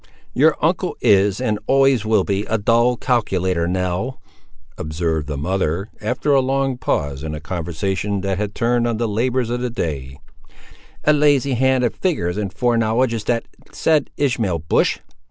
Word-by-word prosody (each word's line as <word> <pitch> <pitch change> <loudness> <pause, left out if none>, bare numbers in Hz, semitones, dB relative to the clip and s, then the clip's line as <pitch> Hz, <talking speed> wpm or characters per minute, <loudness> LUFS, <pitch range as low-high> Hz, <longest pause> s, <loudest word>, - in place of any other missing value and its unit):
"Your - - +4
uncle - - 0
is, 100 0 +3
and 110 -5 -1
always 135 -4 +4
will 110 -3 +3
be, 100 +1 -1
a 110 - 0
dull 120 +3 +2
calculator, 95 -9 0
Nell," 90 +7 -2 0.6
observed 80 -1 -2
the 75 -2 -4
mother, 90 +4 -1
after 125 +7 -1
a 135 - +5
long 135 0 0
pause 70 - -1
in 75 0 -4
a - - -6
conversation 95 +4 -3
that 95 -1 -2
had 105 -1 -3
turned 120 0 +1
on 115 -2 -1
the 115 0 0
labours 120 +3 0
of 120 0 -2
the 125 - -1
day; 70 - -4 0.9
"a 150 - +4
lazy 145 -2 +3
hand 130 +1 +2
at 120 - 0
figures 135 - -1
and 100 -3 -2
foreknowledge 115 +1 +1
is 110 -2 -4
that 115 -1 0 0.3
said 155 -3 +1
Ishmael 115 - 0
Bush! 80 0 +1
110 Hz, 165 wpm, -20 LUFS, 90-125 Hz, 0.9 s, a